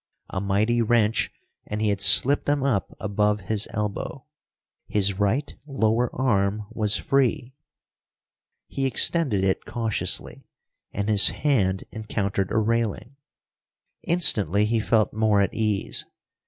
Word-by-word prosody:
A 95 - -3
mighty 105 +4 0
wrench, 115 -1 +1 0.4
and 105 - -4
he 110 -1 0
had 100 -1 -2
slipped 100 +8 +5
them 145 -1 0
up 125 -8 -2
above 105 0 -1
his 105 +3 -3
elbow. 105 -1 -5 0.6
His 100 -1 0
right 115 +9 -1
lower 120 -3 0
arm 105 -4 0
was 105 -2 +1
free. 130 -2 -1 1.1
He 135 0 -2
extended 130 - +2
it 95 0 -1
cautiously, 115 -3 -3 0.4
and 100 +1 -4
his 105 -4 +7
hand 95 -11 0
encountered 100 -3 -3
a 110 - -1
railing. 115 +2 -2 0.9
Instantly 105 - +2
he 115 +1 0
felt 110 0 +1
more 110 -1 +1
at 100 +3 0
ease. 110 -3 -1
110 Hz, 125 wpm, -24 LUFS, 100-120 Hz, 1.1 s, his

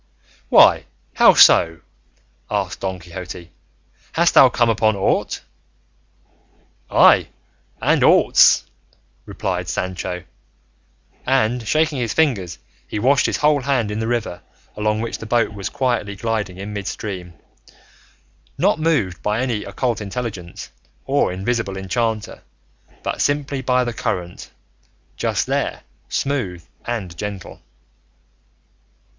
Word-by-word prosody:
"Why, - - +6 0.3
how - - +6
so?" 80 -1 +6 0.7
asked - - -2
Don 95 -1 -3
Quixote; 90 0 -9 0.6
"hast 170 +1 +3
thou 130 - +8
come 120 -1 +1
upon 110 -1 +2
aught?" 95 - -1 1.5
"Ay, - - +5 0.5
and - - +2
aughts," - - +5 0.6
replied - - -3
Sancho; 90 -1 -4 1.0
and 125 -3 0
shaking 155 +1 +1
his 115 -3 -2
fingers 120 - 0 0.3
he - - -5
washed 130 +5 +3
his - - -1
whole 150 -1 +2
hand 125 -5 0
in 105 - -3
the 110 - -2
river 115 -7 -2 0.3
along 105 +1 -1
which 115 0 -4
the 115 - -8
boat 115 -1 +1
was 100 -2 -5
quietly 120 -6 -1
gliding 105 -3 -3
in 100 +2 -7
midstream, 95 -3 -6 1.2
not - - +2
moved 145 - 0
by 105 +2 -1
any 120 -5 -1
occult 115 +3 -2
intelligence 100 - -6 0.3
or 140 -7 +1
invisible 100 +1 -2
enchanter, 110 +3 -2 0.6
but - - -3
simply 145 -1 -1
by 125 0 +1
the 120 -1 -3
current, 90 -5 -4 0.7
just - - -1
there - - -2 0.3
smooth 105 -12 -2 0.2
and 105 -8 -4
gentle. 100 -1 -7
110 Hz, 115 wpm, -20 LUFS, 95-125 Hz, 1.5 s, thou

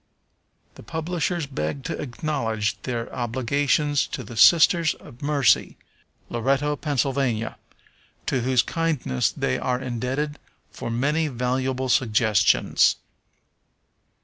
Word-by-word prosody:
The - - -13
publishers 165 - -2
beg 135 - -4
to - - -4
acknowledge 115 -6 -2
their 120 -2 -4
obligations 135 +4 0
to 130 - -6
the 115 +2 -10
Sisters 165 +6 +5
of 120 - -15
Mercy, 145 -3 +2 0.5
Loretto, 135 +5 0
Pa., 145 0 -3
to 130 -1 -3
whose 125 0 +2
kindness 155 - 0
they 65 - -2
are 125 -1 -1
indebted 130 +4 -3 0.3
for - - -6
many 150 +7 0
valuable 130 0 -1
suggestions. 110 -4 +3
130 Hz, 100 wpm, -24 LUFS, 120-150 Hz, 0.5 s, Sisters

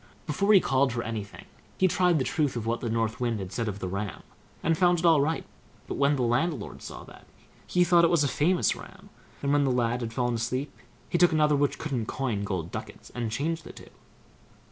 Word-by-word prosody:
Before 200 +7 +1
he 200 - +8
called 135 -4 +2
for 120 0 -2
anything, 110 -3 -6 0.3
he 185 - +4
tried 180 -1 +3
the 130 - 0
truth 150 -5 0
of 115 -2 -3
what 115 +1 -1
the 120 - -2
North 115 -1 -1
Wind 120 -2 0
had 95 -2 -6
said 115 -2 -2
of 100 -2 -3
the 95 - -4
ram, 100 +2 -4 0.4
and 165 - +2
found 175 +1 +3
it 170 - -2
all 160 -4 +6
right; 160 +3 -1 0.4
but, - - -5
when 140 +1 +2
the 130 - 0
landlord 130 +8 -1
saw - - -8
that, - - -15 0.4
he 180 - +3
thought 175 -1 +5
it 170 - +5
was 170 -4 +3
a - - +2
famous 170 +7 +2
ram, - - -13 0.3
and, 140 0 +1
when 145 0 +4
the 135 - +2
lad 120 -1 0
had 115 -1 -3
fallen 120 0 0
asleep, 125 +5 -2 0.3
he 175 - -1
took 175 -1 +5
another 150 -1 +3
which 145 0 +1
couldn't 130 -8 -3
coin 120 -7 -2
gold 90 -5 -3
ducats, - - -8
and 120 -2 -3
changed 160 +6 -2
the - - -10
two. - - -14
135 Hz, 230 wpm, -27 LUFS, 115-160 Hz, 0.4 s, he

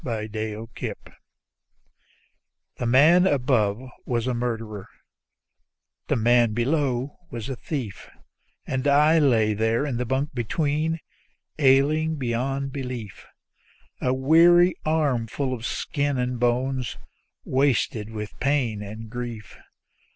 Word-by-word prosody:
My 110 -4 -3
Friends 110 +1 -5 1.8
The 120 - -2
man 160 +9 +6
above 125 - +1 0.2
was 120 -2 -1
a 130 - 0
murderer, 115 -4 -4 1.2
the - - +1
man 120 0 +3
below 135 +1 -1
was 115 +1 -6
a 135 - -3
thief; 120 - -6 0.6
And 130 +1 -2
I 150 +3 +5
lay 115 -7 +3
there 115 +5 +1
in 135 -5 -2
the 125 - -2
bunk 135 +5 -1
between, 150 +6 -1 0.6
ailing 150 +3 +3
beyond 135 +1 -2
belief; 125 -7 -6 0.7
A 125 - +1
weary 170 +7 +5
armful 140 -4 0
of 120 -1 -4
skin 145 -2 -2
and 125 -1 -2
bone, 125 +2 +1 0.6
wasted 125 -5 +1
with 105 -1 -7
pain 125 -6 0
and 110 +2 -8
grief. 120 -2 -7
125 Hz, 110 wpm, -24 LUFS, 115-140 Hz, 1.8 s, man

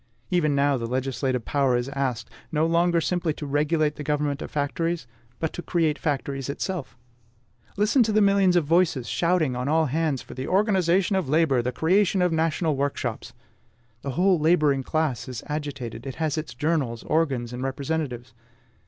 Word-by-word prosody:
Even 155 -5 +2
now 140 0 +2
the 115 -1 -4
legislative 130 -1 -1
power 135 -4 +2
is 120 +1 -2
asked, 135 -4 -2 0.2
no 155 0 +2
longer 170 +1 +3
simply 170 -1 0
to 150 - -6
regulate 150 +1 +1
the 150 - -5
government 145 0 -1
of - - -5
factories, 160 +1 -2 0.3
but 160 - -2
to - - -5
create 165 -4 0
factories 140 -3 -2
itself. 165 +1 -4 0.8
Listen 210 +6 +3
to 225 -2 +2
the 215 - +3
millions 200 -3 +4
of 170 -4 +3
voices 160 -6 +2
shouting 170 -5 +1
on 125 +1 -3
all 160 +2 +3
hands 150 -1 -1
for - - -11
THE 130 +1 -5
ORGANISATION 190 -1 +2
OF 185 -8 -1
LABOR, 150 -4 +3
THE 125 +1 -2
CREATION 185 +5 +2
OF 180 -2 +2
NATIONAL 160 -1 +1
WORKSHOPS! 125 -4 -3 0.7
The 140 - -5
whole 185 -1 +4
laboring 150 -4 +3
class 155 -2 -1
is 125 -3 -6
agitated: 140 -5 -5
it 130 - -5
has 160 -1 -1
its 155 -1 -5
journals, 145 -7 -1
organs, 135 -7 0
and 125 - -5
representatives. 135 -3 -3
150 Hz, 170 wpm, -25 LUFS, 135-170 Hz, 0.8 s, millions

